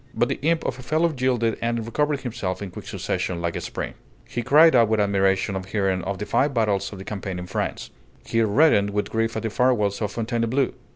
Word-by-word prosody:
But 120 - +1
the - - -2
imp 160 +3 +1
of 130 - -3
a - - -7
fellow 155 +6 +1
yielded 125 -3 0
and 115 -1 -1
recovered 145 +4 0
himself 115 -7 -3
in 100 -3 -6
quick - - -10
succession 90 -2 -2
like 85 0 -2
a - - -3
spring. - - -5 0.3
He 120 - -3
cried 155 +5 +6
out 115 -2 +6
with 110 -1 +2
admiration 95 -1 +1
on 95 - -2
hearing 95 -1 -1
of 100 0 -2
the 105 - -4
five 140 +4 +1
battles 100 -4 +1
of 100 - -8
the 95 - -9
campaign 95 -3 -5
in 90 - -5
France; 90 - -4 0.3
he 115 - +1
reddened 110 -2 +4
with 105 0 -2
grief 115 0 0
at 110 - -3
the 110 - -2
farewells 110 -5 +1
of 105 -1 -1
Fontainebleau. 120 +3 0
110 Hz, 225 wpm, -24 LUFS, 100-125 Hz, 0.3 s, cried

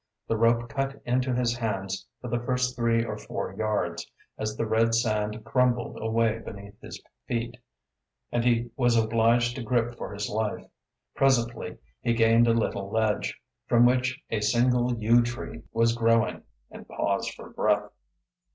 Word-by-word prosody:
The 115 - 0
rope 115 +1 +2
cut 135 +2 -3
into 125 +1 +1
his 120 -1 +1
hands 95 -5 -3
for 125 - -7
the 120 0 -1
first 125 0 -1
three 115 -1 +1
or - - -5
four - - -5
yards, 110 0 -2 0.3
as 110 0 -4
the 115 - 0
red 115 +1 +2
sand 110 -1 -1
crumbled 125 0 +1
away 115 0 +1
beneath 100 -1 -10
his - - -9 0.3
feet, 120 0 -2 0.8
and 120 - 0
he 120 -1 +1
was 120 -3 +3
obliged 115 +2 +2
to - - -4
grip 120 +1 0
for - - -5
his 100 0 -3
life. 105 0 -2 0.5
Presently 120 -8 +1 0.2
he 120 - +1
gained 115 +1 +4
a - - +5
little 100 -3 -1
ledge, 110 -1 0 0.3
from 120 0 +5
which 130 +2 +2
a 110 - 0
single 120 +3 +2
yew 115 +2 +4
tree 120 0 -5
was 115 0 +2
growing, 115 -1 +2 0.3
and - - -11
paused - - -1
for - - -11
breath. 105 -1 +1
115 Hz, 160 wpm, -27 LUFS, 110-120 Hz, 0.8 s, a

